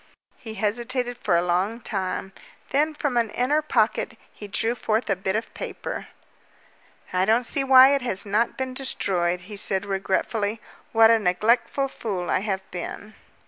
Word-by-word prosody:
He 220 -2 -8
hesitated 240 +4 -1
for 180 -6 +1
a 170 - +1
long 185 +6 0
time. 190 -3 -3 0.4
Then 305 +3 +1
from 290 -4 -1
an 230 -2 +2
inner 270 +8 +1
pocket 230 -6 0 0.2
he 205 - -9
drew 225 +3 0
forth 225 -2 -1
a - - +3
bit 190 +1 -2
of 220 - -3
paper. - - -6 1.1
"I 185 0 +2
don't 225 +5 +3
see 275 - +1
why 265 0 +8
it 280 - +1
has 225 -6 -1
not 210 +4 0
been 260 -1 -3
destroyed," 180 -9 -1
he 205 +4 -10
said 195 -1 0
regretfully. 200 +2 -1 0.3
"What 225 0 +6
a 230 - +4
neglectful 225 +8 +1
fool 195 -9 -4
I - - +2
have 195 -1 -2
been!" 200 +4 -6
220 Hz, 165 wpm, -24 LUFS, 195-245 Hz, 1.1 s, why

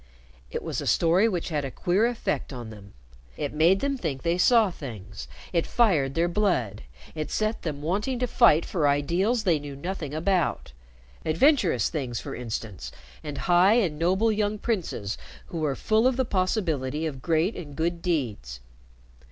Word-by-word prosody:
It - - -4
was - - -3
a - - -5
story 180 +7 +3
which 180 -5 -3
had 150 -3 -1
a 135 - -3
queer 185 - +1
effect 240 -9 -2
on 120 -4 -7
them. 100 -2 -13 0.4
It 145 - -3
made 170 +6 +4
them 275 -1 -1
think 140 - -3
they 170 +1 0
saw 225 -1 +5
things; 110 - -8 0.3
it 170 - +1
fired 155 - +2
their 170 +1 +2
blood; 170 - 0 0.3
it 155 -2 -4
set 215 +1 -1
them 150 -3 -4
wanting 205 - -1
to 250 - 0
fight 230 -9 +4
for 155 -5 0
ideals 175 - +1
they 170 -6 +2
knew 145 -1 -8
nothing 160 0 -5
about 170 - 0 0.5
adventurous 170 - +3
things, 130 -7 -3
for - - -7
instance, 115 -4 -5 0.3
and 145 -2 -6
high 180 +3 +5
and 180 -11 +1
noble 190 +7 +2
young 210 0 0
princes 180 - -3 0.3
who 170 - -6
were 150 -3 0
full 220 - +2
of 260 -1 +1
the 260 - +1
possibility 165 - -1
of 135 -5 -5
great 165 - +1
and 145 -5 -8
good 170 +2 -1
deeds. 110 - -2
165 Hz, 170 wpm, -26 LUFS, 140-200 Hz, 0.5 s, saw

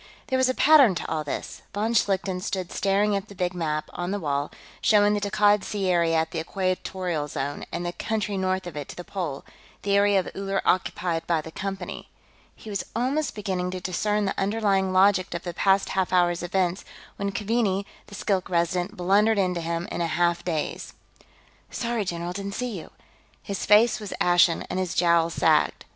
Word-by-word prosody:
There 260 - +2
was 260 0 +3
a 255 - 0
pattern 280 - +6
to - - -4
all 155 -1 -2
this. 145 - -5
Von 220 +3 0
Schlichten 190 -4 +1
stood 185 -1 -3
staring 200 +1 +1
at 200 +1 -3
the 200 - -12
big 180 -1 -1
map, 155 -3 -2
on 175 0 -3
the 205 +1 -1
wall, 145 -3 -1 0.3
showing 210 -1 +4
the 205 - +1
Takkad 205 0 +3
Sea 200 -3 -2
area 170 -2 +2
at 160 0 0
the 165 - -3
Equatorial 185 -2 -2
Zone, 145 0 -4
and 175 +1 -3
the 175 - -1
country 215 -1 -2
north 190 -1 -1
of 175 -4 -7
it 145 -2 -5
to - - -8
the 175 - -7
pole, 170 -8 -5 0.4
the 200 0 +1
area 200 -1 +4
of 185 - -3
Uller 195 0 -1
occupied 175 -2 0
by 170 -2 +2
the 160 +1 -8
Company. 195 +3 -5 0.5
He - - -15
was 200 - -2
almost 265 +5 0
beginning 190 -3 -2
to 185 0 -4
discern 205 +3 0
the 195 - -2
underlying 195 -2 +1
logic 185 -1 +3
of 170 - -4
the 175 - -5
past 195 +2 +2
half 190 -1 0
hour's 175 -1 +2
events 180 +1 0 0.3
when 200 0 -2
Keaveney, 205 -2 0 0.2
the 205 - -10
Skilk 190 -3 -1
Resident, 175 +3 0
blundered 205 +5 +3
into 180 -3 +1
him 170 +1 -3
in - - -3
a 170 - +1
half 175 +1 +1
daze. 160 -4 -3 0.7
"Sorry, 235 -3 -2
general, 175 0 -3
didn't 200 +1 -5
see 250 -3 -3
you." 170 - -8 0.5
His 200 - -4
face 215 +3 +5
was 210 -2 -6
ashen, 175 -1 +4
and 185 - -3
his 185 -2 -2
jowls 170 -1 +3
sagged. - - +2
190 Hz, 195 wpm, -25 LUFS, 175-205 Hz, 0.7 s, pattern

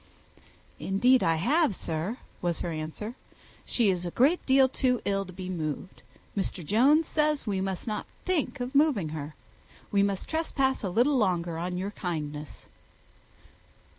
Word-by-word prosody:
"Indeed 245 +7 +3
I 165 - +3
have, 265 - +2
sir," 165 +10 -3 0.2
was 175 -2 -1
her 175 - -2
answer. 160 +8 -5 0.5
"She 225 -5 +2
is 180 -1 -2
a 175 - -2
great 280 - +3
deal 265 0 +6
too 255 -1 +1
ill 195 0 0
to - - -9
be 185 0 -7
moved. 165 0 -4 0.3
Mr. 190 -4 -2
Jones 275 - +4
says 300 -2 +1
we 195 -3 -1
must 190 -1 -3
not 215 -3 -3 0.2
think 340 -6 0
of 250 +2 -4
moving 275 - +3
her. 150 -1 -6 0.6
We 200 - +3
must 200 -1 0
trespass 270 -6 0
a 195 - -1
little 250 +9 +3
longer 175 -6 +1
on 180 +1 -3
your 195 +3 -3
kindness." 150 -6 -5
200 Hz, 155 wpm, -28 LUFS, 175-260 Hz, 0.6 s, deal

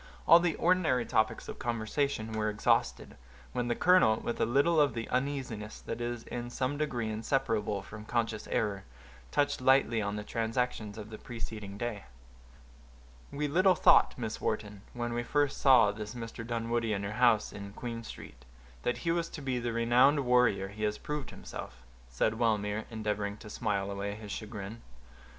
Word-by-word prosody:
All 170 - +9
the 170 -2 +1
ordinary 165 -9 +2
topics 110 0 0
of - - -7
conversation 115 0 -1
were 110 -1 0
exhausted, 105 0 0 0.4
when 125 -1 -1
the 120 - +1
colonel, 180 -11 +5
with 120 - -3
a - - +3
little 145 +6 +4
of 140 -6 +2
the 115 -1 -3
uneasiness 125 -5 -2
that 115 +1 -5
is 120 -1 -3
in 120 0 -5
some 130 +3 -1
degree 125 -7 -2
inseparable 110 -3 -1
from 105 +2 -10
conscious 115 -2 -1
error, 100 -3 -1 0.5
touched 145 -2 +1
lightly 130 -3 +4
on 100 0 -2
the 105 - -4
transactions 115 -1 -2
of 110 0 -8
the 110 - -8
preceding 110 -4 -7
day. 105 -5 -4 1.3
"We 150 +1 -1
little 185 +5 +4
thought, - - +5
Miss 110 -3 -4
Wharton, 105 -2 -2
when 120 -1 -3
I 120 - 0
first 145 +3 0
saw 125 -7 +6
this 105 +2 -7
Mr. 115 -1 -6
Dunwoodie 115 -1 -1
in 100 -1 -2
your 100 - -3
house 115 -1 +3
in 100 0 -7
Queen 115 -1 -5
Street, - - -10 0.4
that 120 - -1
he 165 - +3
was 170 0 0
to 150 - -8
be 130 -2 -1
the 120 0 -2
renowned 125 +5 +4
warrior 125 -7 +3
he 105 +2 -10
has 105 0 0
proved 150 -5 -4
himself," - - -9 0.3
said 110 - 0
Wellmere, 105 -2 +1
endeavoring 105 -2 -2
to 105 - -11
smile 100 -4 -1
away 100 +1 -3
his 105 -1 -9
chagrin. 110 +1 -6
115 Hz, 175 wpm, -31 LUFS, 105-125 Hz, 1.3 s, All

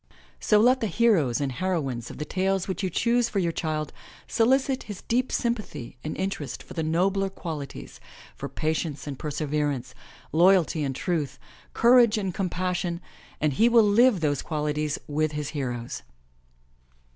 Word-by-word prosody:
So 210 - +3
let 250 +4 +5
the 225 - -1
heroes 190 - +2
and 140 -2 -1
heroines 135 -7 -2
of - - -9
the 150 - -4
tales 190 +2 0
which 190 -1 -3
you 190 - 0
choose 235 +6 +2
for - - -3
your 175 -3 +1
child 155 -2 -3 0.3
solicit 265 +3 +2
his 200 -3 -7
deep 250 +2 0
sympathy 220 - -3
and 155 - -4
interest 190 -7 -3
for - - -11
the 165 - -2
nobler 190 +5 +1
qualities, 160 -7 -7 0.4
for - - -6
patience 155 -3 -2
and 140 -3 -6
perseverance, 145 -3 -2 0.4
loyalty 170 -2 +4
and 135 -2 -2
truth, 150 -4 -2 0.4
cour 245 +2 +6
age 235 -2 +4
and 195 -4 -2
compassion, 180 -2 -2 0.4
and 150 -2 +1
he 230 - +4
will 235 -1 +6
live 220 -1 +4
those 145 -3 +1
qualities 150 -1 -2
with 155 +1 0
his 150 -1 -3
heroes. 120 -5 -4
170 Hz, 155 wpm, -26 LUFS, 150-205 Hz, 0.4 s, cour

